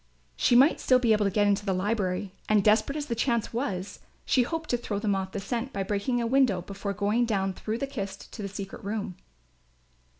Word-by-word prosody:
She 240 - +3
might 270 +5 +6
still 255 - +4
be 240 -3 +3
able 210 -1 +2
to - - +3
get 205 +2 +2
into 205 0 +2
the 195 -2 0
library 190 -1 -1 0.2
and, 210 -2 +4
desperate 215 +6 +3
as 295 - -3
the 255 - -2
chance 235 -1 0
was, 200 -6 -3 0.3
she 255 - +3
hoped 320 +5 -2
to 245 - +2
throw 220 -3 -4
them 205 0 0
off 190 -1 -2
the 200 - -4
scent 235 +6 -3
by 195 - -2
breaking 205 +5 -1
a 235 - 0
window 235 -7 +2
before 200 +1 -5
going 210 +4 +1
down 195 -4 0
through 220 +4 -4
the 275 - -2
kist 200 -8 -7
to 220 - -7
the 200 - -3
secret 195 0 -7
room. 200 -2 -3
210 Hz, 225 wpm, -27 LUFS, 195-240 Hz, 0.3 s, might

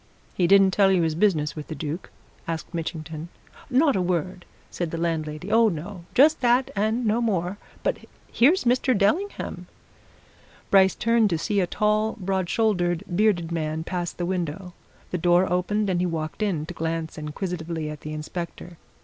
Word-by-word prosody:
"He 175 - +2
didn't 195 0 +6
tell 195 0 +4
you 180 -3 +3
his 160 -1 +1
business 155 -4 +1
with 150 -2 -7
the 155 - -5
Duke?" 155 +4 -5 0.4
asked 165 +1 -4
Mitchington. 160 -1 -5 0.4
"Not 275 +3 +3
a 190 - +1
word!" 180 0 -2 0.3
said 175 -2 -3
the 165 - -4
landlady. 165 +2 -2
"Oh, 225 0 +5
no! 175 +1 -6
just 310 +4 +5
that, 245 +1 +3
and 220 +4 0
no 220 +2 +2
more. 195 -3 -1 0.2
But - - 0 0.3
here's 300 +11 +4
Mr. 250 0 +2
Dellingham." 320 - -1 1.0
Bryce 190 -1 +5
turned 230 -2 +3
to 170 - 0
see 200 +5 0
a 180 - +1
tall, 215 +3 +1
broad 190 -2 -1
shouldered, 180 -6 +1
bearded 180 -5 +2
man 160 -1 -2
pass 175 0 -3
the 175 - -4
window 180 0 -3 0.4
the 180 - -1
door 175 +2 +4
opened 205 +4 0
and 180 -2 0
he 180 - +1
walked 160 +3 -4
in, 180 -8 0
to 175 - -7
glance 165 -1 -3
inquisitively 160 0 -4
at 150 - -9
the 155 - -6
inspector. 170 +2 -6
180 Hz, 170 wpm, -25 LUFS, 165-210 Hz, 1.0 s, didn't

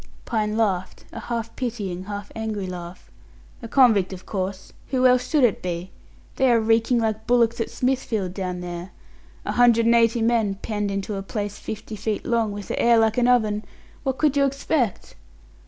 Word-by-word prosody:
Pine 215 -1 -1
laughed 190 -5 -1
a - - -7
half 230 -1 -4
pitying, 205 -8 -4
half 205 0 -6
angry 220 -3 -3
laugh. 180 -1 -8 0.5
"A 230 - -6
convict, 225 -7 +4
of 185 -1 -9
course. 190 -1 -4
Who 255 -1 +1
else 250 0 +4
should 300 -4 +3
it 235 -5 +3
be? 180 +1 -4 0.5
They 265 -2 +4
are 235 - +5
reeking 225 +2 +2
like 220 -1 -1
bullocks 235 -1 +3
at - - -2
Smithfield 230 -7 -1
down 185 -2 -4
there. 175 +1 -6 0.5
A - - -1
hundred 235 -2 +4
and 230 - +5
eighty 230 0 +3
men 225 -4 +2
penned 210 0 -3
into 195 +1 -3
a - - -3
place 205 0 -4
fifty 215 0 -6
feet 215 0 -3
long, 230 -3 +1
with 205 -1 -7
the - - -1
air 235 0 +5
like 225 +1 +3
an 245 - +3
oven 215 -4 +2 0.4
what 265 -2 -2
could 300 -2 +2
you 280 - +4
expect?" 275 - -1
220 Hz, 185 wpm, -23 LUFS, 195-240 Hz, 0.5 s, are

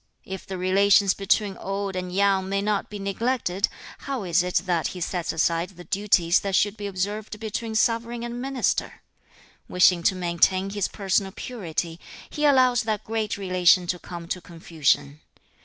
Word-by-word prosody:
If 190 0 -7
the 190 - -5
relations 195 +1 +4
between 200 0 0
old 195 0 -4
and 180 -1 -4
young 195 0 +2
may 195 0 0
not 210 -1 -1
be 210 - -6
neglected, 200 -1 -1 0.3
how 270 -5 -4
is 175 -1 +2
it 180 0 -4
that 175 -3 0
he - - -6
sets 175 0 -2
aside 165 +2 0
the 180 -2 -13
duties 185 -3 +2
that 195 -1 -2
should 205 +1 +2
be 205 -1 -5
observed 205 +3 -4
between 220 +1 -4
sovereign 230 +1 0
and 240 +1 -5
minister? 270 -1 -1 0.7
Wishing 180 -1 +4
to 190 +3 +2
maintain 185 +2 +1
his 205 -2 -1
personal 195 -1 -1
purity, 175 -7 -5 0.3
he 300 - -1
allows 255 -4 +5
that 220 -3 -2
great 220 -2 -2
relation 185 -2 +3
to 180 +1 -2
come 170 -1 -8
to 180 - -3
confusion. 155 -4 -1
195 Hz, 165 wpm, -25 LUFS, 180-215 Hz, 0.7 s, allows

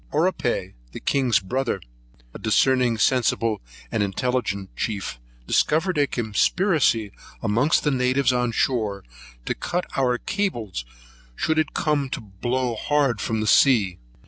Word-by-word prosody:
Oripai, 145 - 0 0.2
the - - -6
king's 130 -6 +2
brother, 120 +3 -2 0.5
a - - -8
discerning, 120 +1 +2
sensible, 115 -2 +1 0.3
and - - 0
intelligent 100 -2 -2
chief, 100 - -3 0.3
discovered 165 - +2
a 145 - +3
conspiracy 115 - +1 0.3
amongst 115 +8 +2
the 150 - +2
natives 130 0 +2
on 125 -1 +1
shore 110 -5 0 0.4
to - - 0
cut 180 +1 -3
our 125 -2 +2
cables 120 - -3 0.5
should 160 - +1
it 155 - -1
come 150 -4 0
to - - -3
blow 120 +5 -2
hard 135 0 +1
from 110 -1 -1
the - - -1
sea. 105 -9 +4
125 Hz, 130 wpm, -24 LUFS, 110-140 Hz, 0.5 s, sea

